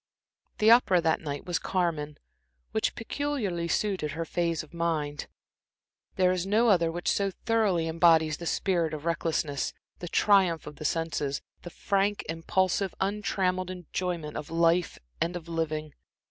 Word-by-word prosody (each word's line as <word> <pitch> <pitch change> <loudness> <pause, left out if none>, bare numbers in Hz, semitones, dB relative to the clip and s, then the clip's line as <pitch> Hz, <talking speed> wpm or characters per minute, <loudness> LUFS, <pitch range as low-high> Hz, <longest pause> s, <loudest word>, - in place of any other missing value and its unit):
The 215 +1 +5
opera 230 -7 +6
that 165 -1 +1
night 145 -3 -5
was 175 -2 -1
Carmen, 160 -5 -1 0.5
which - - 0
peculiarly 225 -9 -2
suited 185 -6 -1
her 165 +1 -3
phase 170 -1 -1
of 155 - -17
mind. 155 -3 -2 0.9
There 185 -1 +3
is 185 0 -1
no 225 +4 +3
other 170 -5 +3
which 175 +1 -5
so 200 -1 +2
thoroughly 195 -5 0
embodies 160 -2 +4
the 170 - -6
spirit 170 -5 0
of 150 +1 -9
recklessness, 160 -4 -1 0.3
the 175 - -6
triumph 185 -3 +3
of 150 -1 -9
the 155 - -7
senses, 150 -3 -1 0.2
the 175 - -8
frank, 200 +3 0
impulsive, 185 +3 0
untrammeled 190 -2 0
enjoyment 180 -3 -4
of 145 - -6
life 170 +1 +2 0.2
and 175 +1 0
of 175 -1 -7
living. 155 -2 -3
170 Hz, 145 wpm, -28 LUFS, 160-190 Hz, 0.9 s, opera